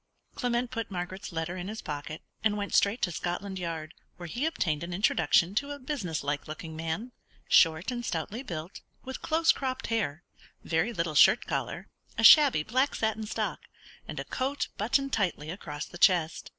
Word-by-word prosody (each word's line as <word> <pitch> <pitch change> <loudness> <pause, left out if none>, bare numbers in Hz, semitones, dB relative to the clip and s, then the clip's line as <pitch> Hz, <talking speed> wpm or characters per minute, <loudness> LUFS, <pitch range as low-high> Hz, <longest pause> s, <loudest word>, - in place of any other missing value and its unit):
Clement 245 -1 -1
put 230 -2 -4
Margaret's 185 +1 -5
letter 165 +1 -3
in 180 0 -5
his 215 +2 -6
pocket, 150 +1 -6 0.2
and 210 -1 +2
went 205 -1 -4
straight 205 +4 +3
to 180 - +2
Scotland 185 +3 -3
Yard, 165 -2 -4 0.2
where 175 - -8
he 245 - -1
obtained 155 - -1
an 175 0 -4
introduction 185 -2 +3
to 280 +7 -1
a 290 - -5
businesslike 175 - -3
looking 155 +1 -7
man, 165 +10 -3 0.4
short 165 +6 +4
and 240 -1 -4
stoutly 200 +4 -3
built, 170 - -7 0.2
with 265 0 -6
close 325 +1 +3
cropped 260 -1 -3
hair, 175 -8 -1 0.4
very 165 +8 0
little 170 -7 -2
shirt 150 - +6
collar, - - -3 0.3
a - - 0
shabby 285 - +8
black 255 - +1
satin 220 -1 -1
stock, - - -2 0.5
and - - -5
a - - -4
coat 275 +2 -2
buttoned 275 +6 0
tightly 175 -7 -1
across 150 -5 -6
the 175 - -11
chest. 175 -5 +3
190 Hz, 175 wpm, -29 LUFS, 165-240 Hz, 0.5 s, shabby